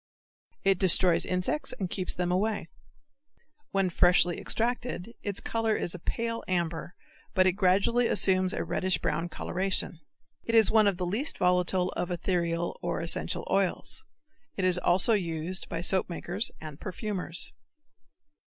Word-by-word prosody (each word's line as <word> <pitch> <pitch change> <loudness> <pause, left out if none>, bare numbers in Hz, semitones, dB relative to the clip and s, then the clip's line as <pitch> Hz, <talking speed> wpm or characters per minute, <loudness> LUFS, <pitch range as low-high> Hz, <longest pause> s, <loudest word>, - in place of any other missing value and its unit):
It 195 -2 +3
destroys 180 -2 +4
insects 185 +12 -1
and 190 - -2
keeps 185 0 -4
them 180 0 -1
away. 195 -2 -1 1.0
When 195 -2 0
freshly 175 0 +4
extracted 235 -2 -2
its 200 -2 -2
color 225 -1 -1
is 175 - -2
pale 230 0 -2
amber 170 -1 -2 0.4
but 185 -1 +4
it 185 - +5
gradually 200 +6 +2
assumes 185 -1 +3
a - - -2
reddish 185 -1 0
brown 170 +1 -2
coloration. 185 -3 -2 0.4
It 230 - -1
is 225 -2 +5
one 220 -2 +5
of 195 -3 +1
the 180 - -2
least 220 - -1
volatile 180 0 +1
of 175 0 -3
ethereal 170 -1 -2
or - - -2
essential 165 0 0
oils. 195 -2 +1 0.5
It 190 - 0
is 180 -1 +4
also 185 +6 +3
used 175 -2 -1
by 165 - -3
soapmakers 185 +2 0
and 155 -2 -9
perfumers. 185 -2 -1
185 Hz, 140 wpm, -28 LUFS, 175-205 Hz, 1.0 s, it